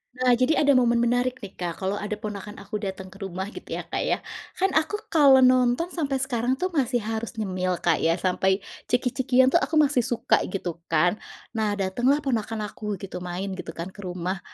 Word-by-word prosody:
Nah 255 Hz, 0 st, +3 dB
jadi 280 Hz, +5 st, +3 dB
ada 285 Hz, -, +5 dB
momen 240 Hz, -2 st, +4 dB
menarik 245 Hz, +1 st, 0 dB
nih 195 Hz, -, -7 dB
Kak, 175 Hz, +1 st, -4 dB
kalau 195 Hz, +2 st, -1 dB
ada 210 Hz, 0 st, -3 dB
ponakan 210 Hz, -1 st, -7 dB
aku 210 Hz, +1 st, -4 dB
datang 190 Hz, -2 st, -6 dB
ke 195 Hz, -, -14 dB
rumah 190 Hz, +1 st, -5 dB
gitu -, -, -7 dB
ya -, -, -4 dB
Kak -, -, -1 dB
ya, -, -, +2 dB, 0.4 s
kan 385 Hz, +1 st, +1 dB
aku 315 Hz, +6 st, +1 dB, 0.2 s
kalau 275 Hz, -4 st, +7 dB
nonton 255 Hz, +6 st, +3 dB
sampai 290 Hz, -5 st, -1 dB
sekarang 250 Hz, 0 st, 0 dB
tuh 365 Hz, +6 st, -2 dB
masih 250 Hz, -7 st, 0 dB
harus 225 Hz, +2 st, -4 dB
nyemil 185 Hz, -4 st, -1 dB
Kak 165 Hz, -3 st, +3 dB
ya 165 Hz, +1 st, +2 dB
sampai 190 Hz, +2 st, +1 dB, 0.2 s
ciki-cikian 255 Hz, +1 st, +2 dB
tuh 340 Hz, -, +5 dB
aku 320 Hz, -, -2 dB
masih 290 Hz, -4 st, +4 dB
suka 240 Hz, -3 st, +2 dB
gitu 180 Hz, -3 st, -4 dB
kan, 175 Hz, +5 st, +2 dB, 0.3 s
nah 215 Hz, -2 st, 0 dB
datanglah 245 Hz, +10 st, +1 dB
ponakan 225 Hz, -4 st, -1 dB
aku 210 Hz, -2 st, -4 dB
gitu 195 Hz, -2 st, -6 dB
main 180 Hz, +2 st, -4 dB
gitu 185 Hz, -, -7 dB
kan 170 Hz, +3 st, -5 dB
ke -, -, -17 dB
rumah, 180 Hz, 0 st, -3 dB
220 Hz, 200 wpm, -25 LUFS, 190-255 Hz, 0.4 s, kalau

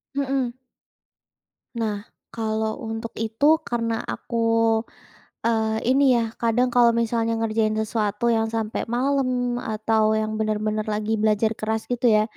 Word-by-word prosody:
Mhm. 265 Hz, -3 st, -1 dB, 1.2 s
Nah, 220 Hz, -2 st, -1 dB, 0.4 s
kalau 220 Hz, -1 st, -2 dB
untuk 225 Hz, 0 st, -5 dB
itu, 225 Hz, +6 st, -1 dB, 0.2 s
karena 230 Hz, -1 st, -1 dB, 0.2 s
aku, 235 Hz, -, -6 dB, 1.1 s
eee, 220 Hz, -1 st, +1 dB
ini 275 Hz, +2 st, +4 dB
ya, 235 Hz, -, +2 dB, 0.2 s
kadang 235 Hz, +2 st, +2 dB
kalau 240 Hz, -1 st, +5 dB
misalnya 230 Hz, 0 st, 0 dB
ngerjain 220 Hz, -1 st, +1 dB
sesuatu 215 Hz, 0 st, -1 dB
yang 225 Hz, -1 st, +1 dB
sampai 220 Hz, -1 st, -2 dB
malam, 250 Hz, -1 st, 0 dB
atau 220 Hz, 0 st, +1 dB
yang 215 Hz, 0 st, -1 dB
benar-benar 215 Hz, 0 st, -1 dB
lagi 215 Hz, +1 st, -1 dB
belajar 215 Hz, 0 st, +2 dB
keras 220 Hz, 0 st, -1 dB
gitu 245 Hz, 0 st, +1 dB
ya. 215 Hz, -2 st, +5 dB
225 Hz, 125 wpm, -23 LUFS, 215-240 Hz, 1.2 s, kalau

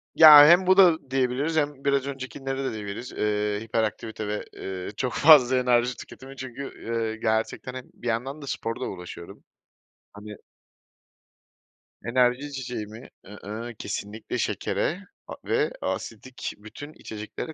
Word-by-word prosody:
Ya, 150 Hz, -2 st, +11 dB
hem 180 Hz, +2 st, +6 dB
bu 185 Hz, +1 st, +5 dB
da 165 Hz, -8 st, +5 dB
diyebiliriz 135 Hz, +5 st, 0 dB
hem 145 Hz, -2 st, -1 dB
biraz 140 Hz, -1 st, +1 dB
öncekileri 135 Hz, 0 st, -5 dB
de 130 Hz, -, -2 dB
diyebiliriz, 105 Hz, +3 st, -6 dB
eee, 105 Hz, -1 st, -1 dB
hiperaktivite 110 Hz, -1 st, -3 dB
ve, 105 Hz, 0 st, -3 dB
eee, 95 Hz, -1 st, -6 dB
çok 125 Hz, -2 st, -2 dB
fazla 135 Hz, -5 st, +6 dB
enerji 125 Hz, 0 st, +2 dB
tüketimi 135 Hz, +1 st, -11 dB
çünkü, 130 Hz, 0 st, -7 dB, 0.3 s
eee, 115 Hz, -1 st, -2 dB
gerçekten, 110 Hz, +3 st, -2 dB
hani, 130 Hz, -1 st, -9 dB
bir 120 Hz, -, -9 dB
yandan 130 Hz, +6 st, -2 dB
da 140 Hz, -, -9 dB
sporla 115 Hz, +1 st, -4 dB
uğraşıyorum, 90 Hz, -2 st, -9 dB, 0.7 s
hani 105 Hz, 0 st, -10 dB, 1.7 s
Enerji 125 Hz, +3 st, +2 dB
içeceği 125 Hz, -6 st, -5 dB
mi? 110 Hz, +3 st, -12 dB, 0.2 s
I-ıh, 105 Hz, +4 st, -8 dB
kesinlikle 105 Hz, +2 st, -5 dB
şekere -, -, -1 dB, 0.3 s
a -, -, -7 dB
ve -, -, +1 dB
asidik 125 Hz, +3 st, -5 dB
bütün 125 Hz, +9 st, -11 dB
içeceklere 110 Hz, +8 st, -7 dB
125 Hz, 135 wpm, -25 LUFS, 110-135 Hz, 1.7 s, Ya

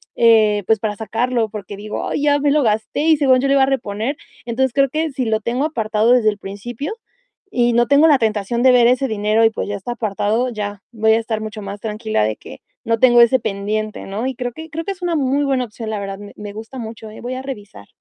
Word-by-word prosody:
eh, 215 Hz, -3 st, +4 dB
pues, 220 Hz, -1 st, +3 dB
para 210 Hz, -1 st, -2 dB
sacarlo, 225 Hz, +2 st, -1 dB
porque 205 Hz, -2 st, -7 dB
digo: 210 Hz, +1 st, -5 dB
"Ay, -, -, -2 dB
ya 290 Hz, -1 st, +4 dB
me 285 Hz, 0 st, +2 dB
lo 300 Hz, +1 st, +3 dB
gasté 220 Hz, +2 st, 0 dB
y 320 Hz, -2 st, +5 dB
según 260 Hz, -3 st, +4 dB
yo 275 Hz, -, 0 dB
lo 275 Hz, -, +3 dB
iba 270 Hz, -, +5 dB
a -, -, +5 dB
reponer". 245 Hz, -1 st, -2 dB, 0.3 s
Entonces, 240 Hz, +2 st, 0 dB
creo 275 Hz, -1 st, +3 dB
que 315 Hz, +3 st, -1 dB
si 260 Hz, -2 st, -2 dB
lo 220 Hz, -1 st, +1 dB
tengo 245 Hz, +6 st, -1 dB
apartado 225 Hz, -6 st, +1 dB
desde 245 Hz, -3 st, +5 dB
el 205 Hz, -, -3 dB
principio 220 Hz, -, -6 dB, 0.6 s
y 240 Hz, -1 st, +2 dB
no 240 Hz, 0 st, +3 dB
tengo 285 Hz, +2 st, +5 dB
la 290 Hz, -4 st, +5 dB
tentación 220 Hz, 0 st, 0 dB
de 260 Hz, -, +7 dB
ver 245 Hz, -1 st, +5 dB
ese 255 Hz, +2 st, +2 dB
dinero 215 Hz, 0 st, +1 dB
y, 225 Hz, -, +6 dB
pues, -, -, -4 dB
ya 205 Hz, -, -2 dB
está 205 Hz, +5 st, -5 dB
apartado, 220 Hz, +2 st, -1 dB
ya 205 Hz, -3 st, -5 dB
voy 220 Hz, -1 st, +2 dB
a 225 Hz, -, +3 dB
estar 225 Hz, -1 st, -3 dB
mucho 215 Hz, 0 st, -6 dB
más 200 Hz, +1 st, -6 dB
tranquila 215 Hz, -, -1 dB
de 110 Hz, 0 st, -1 dB
que -, -, -12 dB, 0.2 s
no 230 Hz, -1 st, +1 dB
tengo 240 Hz, -2 st, +6 dB
ese 235 Hz, +2 st, +5 dB
pendiente, 215 Hz, 0 st, -3 dB
¿no? 210 Hz, +6 st, -3 dB
Y 265 Hz, -, -3 dB
creo 245 Hz, -1 st, -3 dB
que 320 Hz, +4 st, -9 dB
creo 325 Hz, +1 st, -5 dB
que 395 Hz, -, -2 dB
es 385 Hz, -1 st, -9 dB
una 350 Hz, -2 st, 0 dB
muy 280 Hz, -1 st, +1 dB
buena 265 Hz, -2 st, 0 dB
opción, 220 Hz, 0 st, -7 dB
la 215 Hz, -2 st, -2 dB
verdad. 195 Hz, 0 st, -5 dB
Me 205 Hz, 0 st, -11 dB
me 205 Hz, -1 st, -8 dB
gusta 220 Hz, +5 st, -9 dB
mucho, 220 Hz, -1 st, -8 dB
¿eh? 215 Hz, -, -11 dB
Voy 245 Hz, +2 st, -4 dB
a 260 Hz, -, -5 dB
revisar. 205 Hz, -, -9 dB
230 Hz, 255 wpm, -19 LUFS, 215-260 Hz, 0.6 s, de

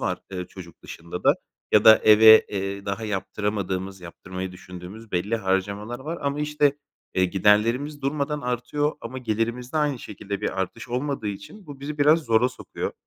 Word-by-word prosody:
var, 90 Hz, -1 st, -1 dB
eee, 90 Hz, -2 st, -4 dB
çocuk 85 Hz, -3 st, -13 dB
dışında 85 Hz, +1 st, -8 dB
da. -, -, +6 dB, 0.4 s
Ya 105 Hz, -, +5 dB
da 110 Hz, 0 st, +9 dB
eve, 110 Hz, +1 st, +8 dB
eee, 100 Hz, 0 st, -4 dB
daha 100 Hz, +3 st, -3 dB
yaptıramadığımız, 95 Hz, -2 st, -3 dB
yaptırmayı 95 Hz, +2 st, -7 dB
düşündüğümüz 90 Hz, +4 st, -11 dB
belli 100 Hz, +6 st, 0 dB
harcamalar 100 Hz, +3 st, -2 dB
var 160 Hz, +5 st, -5 dB
ama 140 Hz, +1 st, -2 dB
işte, 150 Hz, -1 st, +1 dB, 0.4 s
eee, 95 Hz, -, +3 dB
giderlerimiz 115 Hz, +10 st, +2 dB
durmadan 145 Hz, +1 st, -1 dB
artıyor 135 Hz, +4 st, -1 dB
ama 125 Hz, +3 st, -6 dB
gelirimizde 120 Hz, +3 st, -2 dB
aynı 150 Hz, -4 st, +1 dB
şekilde 100 Hz, -2 st, -6 dB
bir 95 Hz, -, -2 dB
artış 115 Hz, +6 st, -5 dB
olmadığı 125 Hz, -2 st, -2 dB
için 135 Hz, -, -9 dB
bu 145 Hz, -2 st, -10 dB
bizi 150 Hz, +2 st, -6 dB
biraz 155 Hz, +3 st, +5 dB
zora 115 Hz, +1 st, +3 dB
sokuyor. 130 Hz, -, -6 dB
110 Hz, 160 wpm, -24 LUFS, 95-140 Hz, 0.4 s, da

